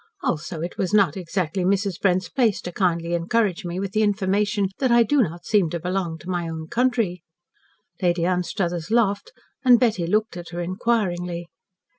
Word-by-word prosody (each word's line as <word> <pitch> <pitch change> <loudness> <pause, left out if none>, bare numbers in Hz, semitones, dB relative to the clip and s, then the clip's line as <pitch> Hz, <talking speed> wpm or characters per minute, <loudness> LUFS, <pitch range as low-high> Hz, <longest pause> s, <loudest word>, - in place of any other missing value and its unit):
Also 160 +1 -2
it 170 +1 -5
was 195 +2 +1
not 200 -3 +4
exactly 180 -1 -2
Mrs. 195 -1 0
Brent's 185 -2 +2
place 230 -4 +1
to 175 - -6
kindly 170 -2 0
encourage 190 +3 0
me 175 +1 -3
with 195 -1 -3
the 215 +1 +1
information 205 0 +1
that 260 -3 +2
I 235 0 +6
do 280 +5 +3
not 170 -4 -3
seem 200 -6 +2
to 170 - -3
belong 180 -1 -2
to 175 - -13
my 175 -2 -2
own 160 -1 -5
country." 230 -8 0 0.8
Lady 175 -2 +2
Anstruthers 175 -1 -1
laughed, 225 - +1 0.3
and 250 -3 +7
Betty 210 -9 +1
looked 215 0 0
at 175 -1 -8
her 175 +1 -6
inquiringly. 175 -3 -1
185 Hz, 175 wpm, -23 LUFS, 175-210 Hz, 0.8 s, and